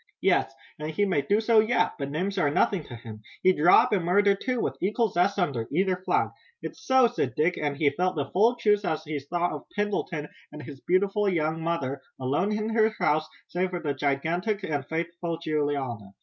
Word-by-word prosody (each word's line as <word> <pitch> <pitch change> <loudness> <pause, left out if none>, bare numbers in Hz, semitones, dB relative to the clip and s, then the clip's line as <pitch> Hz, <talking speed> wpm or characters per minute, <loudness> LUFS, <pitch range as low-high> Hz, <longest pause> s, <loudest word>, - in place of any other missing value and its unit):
"Yes, - - +2 0.3
and 155 0 -4
he 180 +6 +1
may 180 -8 +1
do 200 +10 +1
so 225 0 +4
yet, 220 +3 +2
but 140 -1 -3
names 185 +7 -2
are 145 - +3
nothing 175 +4 +1
to 120 - -9
him. 110 -2 -10 0.2
He'd 185 -5 +3
rob, 175 +5 +6
and 190 -4 +1
murder, 200 +4 +4
too, 250 +5 -2
with - - -1
equal 215 +4 +1
zest 185 +3 +1
under 140 - -1
either 185 +4 +1
flag." 185 +1 0 0.3
"It's - - -8
so," 260 -5 +5
said 240 +1 -1
Dick, 165 +4 +2
and 145 -2 -1
he 150 -1 +2
felt 185 +1 -1
the 145 -3 -1
full 225 +6 +3
truth 210 -3 +2
as 160 -4 -2
he 155 -2 -4
thought 175 +5 -2
of - - -8
Pendleton, 195 -7 -2 0.2
and 150 - -9
his 140 -3 -10
beautiful 200 +2 +1
young 160 -2 -1
mother, 140 -5 -2 0.2
alone 145 +10 0
in 215 +1 -1
her 220 -1 +3
house, 155 +1 +1 0.2
save 180 +1 -1
for 180 -1 -4
the 145 -4 -2
gigantic 165 +9 -1
and 145 -6 -2
faithful 170 +1 -3
Juliana. 145 - -2
175 Hz, 205 wpm, -26 LUFS, 150-200 Hz, 0.3 s, rob